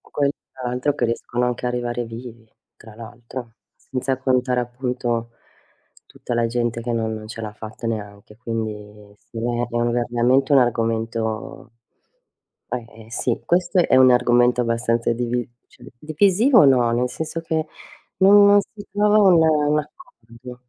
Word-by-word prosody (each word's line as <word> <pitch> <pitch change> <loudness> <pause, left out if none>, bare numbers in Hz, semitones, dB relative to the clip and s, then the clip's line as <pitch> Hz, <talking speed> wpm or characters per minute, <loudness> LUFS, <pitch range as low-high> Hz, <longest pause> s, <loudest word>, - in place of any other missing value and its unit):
Quel 140 -1 -1 0.2
tra 130 -2 -5
l'altro, 125 +4 -1
che - - -1
riescono 120 +1 -2
anche 125 0 -3
a - - +1
arrivare 120 0 -3
vivi, 115 0 -10 0.3
tra 110 -1 -15
l'altro, 115 +1 -10 0.2
senza 130 0 -3
contare 125 -1 +1
appunto, 120 -1 -3 0.8
tutta 120 - -6
la 120 0 +1
gente 120 0 -2
che 120 +1 -3
no 115 -1 -1
non 110 -1 -6
ce 115 - -8
l'ha 110 -2 -6
fatta 110 +2 -8
neanche. 105 -2 -6
Quindi 105 -3 -6
sì, 115 - -12
è - - -4 0.2
è - - -1 0.3
veramente 120 +3 +1
un 140 - +7
argomento 115 +1 -2 1.1
eh, 120 - -4 0.2
eh, 110 - -18
sì, 120 0 -1
questo 180 +2 +1
è - - +3
un 130 0 +7
argomento 125 0 +3
abbastanza 115 0 0
divi 120 0 -2 0.2
cioè, - - -19
divisivo 200 - +3
o - - +6
no, 125 -4 +4
nel 125 +1 0
senso 160 +5 -5
che 160 -1 -2 0.5
non 200 +1 +7
non 205 0 +6
si 205 +1 -13
trova 210 +1 +3
un 190 -5 +6 0.3
un 150 - +3
accordo. 125 - -11
120 Hz, 155 wpm, -21 LUFS, 115-135 Hz, 1.1 s, un